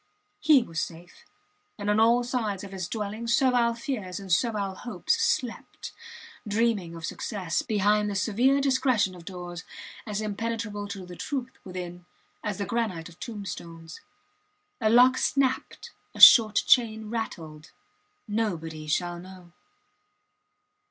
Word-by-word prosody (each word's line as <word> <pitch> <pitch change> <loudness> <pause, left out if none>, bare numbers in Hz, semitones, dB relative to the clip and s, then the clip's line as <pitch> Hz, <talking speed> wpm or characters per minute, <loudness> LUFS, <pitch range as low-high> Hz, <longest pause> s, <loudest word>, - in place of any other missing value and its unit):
He 295 -1 +5
was 165 -8 -4
safe; 175 +1 -9 0.5
and 205 -1 -5
on 210 +1 +3
all 235 +2 +4
sides 225 -6 -2
of 200 - -9
his 185 -3 -4
dwelling 215 +2 -4
servile 235 -1 +3
fears 230 - -4
and 195 -2 -8
servile 205 0 +1
hopes 210 - -2
slept, 360 - -2 0.6
dreaming 205 -5 0
of 165 -1 -6
success, 190 -7 -3
behind 210 0 +1
the 200 - -4
severe 235 +8 +2
discretion 260 -7 +2
of 175 -2 -13
doors 175 -1 -7 0.4
as 210 -1 -2
impenetrable 215 -1 -3
to 200 -2 -7
the 180 0 -10
truth 260 - -4
within 180 -1 -8 0.4
as 210 -2 -3
the 200 - -2
granite 210 -9 -2
of 170 - -18
tombstones. 170 -7 -8 0.8
A 215 - +3
lock 250 +3 +6
snapped 265 -2 -1 0.2
a - - -9
short 220 -3 +9
chain 220 -3 +3
rattled. 160 -9 -5 0.6
Nobody 165 -8 -3
shall 175 +3 -1
know! 185 -1 -13
210 Hz, 130 wpm, -27 LUFS, 180-235 Hz, 0.8 s, short